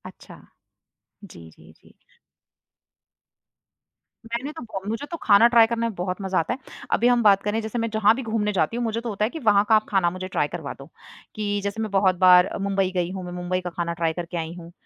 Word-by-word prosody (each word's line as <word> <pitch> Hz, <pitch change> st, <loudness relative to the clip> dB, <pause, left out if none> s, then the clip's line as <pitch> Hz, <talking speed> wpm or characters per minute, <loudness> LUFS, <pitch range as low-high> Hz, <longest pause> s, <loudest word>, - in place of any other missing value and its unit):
अच्छा। -, -, -15 dB, 0.9 s
जी, 85 Hz, -1 st, -13 dB
जी, 80 Hz, +1 st, -18 dB
जी। -, -, -22 dB, 2.3 s
मैंने 235 Hz, +5 st, -4 dB
तो 320 Hz, -, -10 dB
बहो 215 Hz, -4 st, -6 dB
मुझे 225 Hz, +6 st, -3 dB
तो 335 Hz, -, -4 dB
खाना 210 Hz, +2 st, +6 dB
ट्राई 230 Hz, -1 st, +7 dB
करने 230 Hz, 0 st, -1 dB
में 230 Hz, -, -5 dB
बहुत 180 Hz, +2 st, -4 dB
मज़ा 190 Hz, -1 st, 0 dB
आता 165 Hz, +8 st, -1 dB
है। 260 Hz, -, -7 dB, 0.3 s
अभी 240 Hz, -, +3 dB
हम 245 Hz, -1 st, +3 dB
बात 200 Hz, -2 st, +5 dB
करें, 210 Hz, +2 st, -1 dB
जैसे 220 Hz, +2 st, -5 dB
मैं 230 Hz, 0 st, -1 dB
जहाँ 220 Hz, -1 st, +3 dB
भी 265 Hz, -, -5 dB
घूमने 220 Hz, -2 st, -1 dB
जाती 190 Hz, +5 st, 0 dB
हूँ, 240 Hz, -, -1 dB
मुझे 225 Hz, 0 st, -2 dB
तो 235 Hz, -, -5 dB
होता 210 Hz, 0 st, -1 dB
है -, -, -2 dB
कि 320 Hz, -, -7 dB
वहाँ 200 Hz, -1 st, +4 dB
का 220 Hz, -, +6 dB
आप 215 Hz, -, +2 dB
खाना 190 Hz, -4 st, +2 dB
मुझे 185 Hz, +1 st, -6 dB
ट्राई 150 Hz, -5 st, -1 dB
करवा 160 Hz, -3 st, -6 dB
दो, 135 Hz, +3 st, -14 dB, 0.5 s
कि 205 Hz, -1 st, -2 dB
जैसे 200 Hz, +2 st, -3 dB
मैं 215 Hz, -2 st, -3 dB
बहुत 190 Hz, -2 st, +3 dB
बार 180 Hz, 0 st, +7 dB
मुंबई 195 Hz, -1 st, 0 dB
गई 175 Hz, 0 st, -1 dB
हूँ, 190 Hz, -1 st, -6 dB
मैं 175 Hz, -, -7 dB
मुंबई 180 Hz, +1 st, -3 dB
का 180 Hz, -, -5 dB
खाना 170 Hz, -1 st, -3 dB
ट्राई 165 Hz, -1 st, -1 dB
करके 175 Hz, +1 st, -5 dB
आई 165 Hz, 0 st, -4 dB
हूँ। 170 Hz, 0 st, -12 dB
200 Hz, 230 wpm, -23 LUFS, 180-225 Hz, 2.3 s, ट्राई